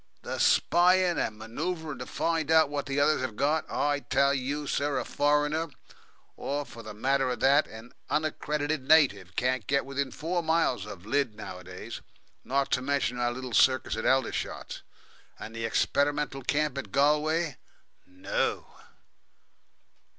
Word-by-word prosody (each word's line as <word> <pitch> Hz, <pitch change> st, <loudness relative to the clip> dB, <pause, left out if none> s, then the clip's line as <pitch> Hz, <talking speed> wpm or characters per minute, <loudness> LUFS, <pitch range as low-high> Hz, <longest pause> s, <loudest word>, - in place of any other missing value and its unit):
The -, -, -4 dB
spying 180 Hz, 0 st, +4 dB
and 105 Hz, -, -2 dB
manoeuvring 150 Hz, +6 st, -4 dB
to 125 Hz, -, -6 dB
find 165 Hz, -2 st, -1 dB
out 160 Hz, -3 st, +5 dB
what 145 Hz, -1 st, -3 dB
the 140 Hz, 0 st, -1 dB
others 150 Hz, -1 st, +3 dB
have 130 Hz, -4 st, -3 dB
got. 150 Hz, +6 st, 0 dB
I 145 Hz, 0 st, 0 dB
tell 140 Hz, 0 st, +2 dB
you, 140 Hz, +3 st, -2 dB
sir, 140 Hz, 0 st, 0 dB
a 125 Hz, -, -2 dB
foreigner, 150 Hz, +2 st, +1 dB, 0.7 s
or, 145 Hz, +1 st, -3 dB
for 115 Hz, -, -11 dB
the 110 Hz, -2 st, -9 dB
matter 135 Hz, +4 st, +1 dB
of 125 Hz, -, -3 dB
that, 140 Hz, +3 st, +4 dB
an 110 Hz, +2 st, -11 dB, 0.2 s
unaccredited 150 Hz, -1 st, -1 dB
native, 100 Hz, -, +4 dB
can't 130 Hz, -3 st, 0 dB
get 140 Hz, 0 st, +1 dB
within 140 Hz, 0 st, -2 dB
four 165 Hz, +7 st, -2 dB
miles 160 Hz, -, +1 dB
of 100 Hz, -3 st, -9 dB
Lydd 130 Hz, -1 st, 0 dB
nowadays 90 Hz, -2 st, -8 dB, 0.4 s
not 135 Hz, +1 st, 0 dB
to 125 Hz, -, +2 dB
mention 135 Hz, -2 st, -1 dB
our 120 Hz, 0 st, +1 dB
little 130 Hz, 0 st, -6 dB
circus 130 Hz, +1 st, +3 dB
at 110 Hz, -, -2 dB
Aldershot, 130 Hz, 0 st, -1 dB, 0.6 s
and 110 Hz, +1 st, -9 dB
the 115 Hz, 0 st, -3 dB
experimental 145 Hz, +4 st, 0 dB
camp 145 Hz, +1 st, 0 dB
in 140 Hz, -, -5 dB
Galway. 150 Hz, +2 st, +1 dB, 0.5 s
No!" 90 Hz, 0 st, -2 dB
140 Hz, 150 wpm, -28 LUFS, 125-150 Hz, 0.7 s, out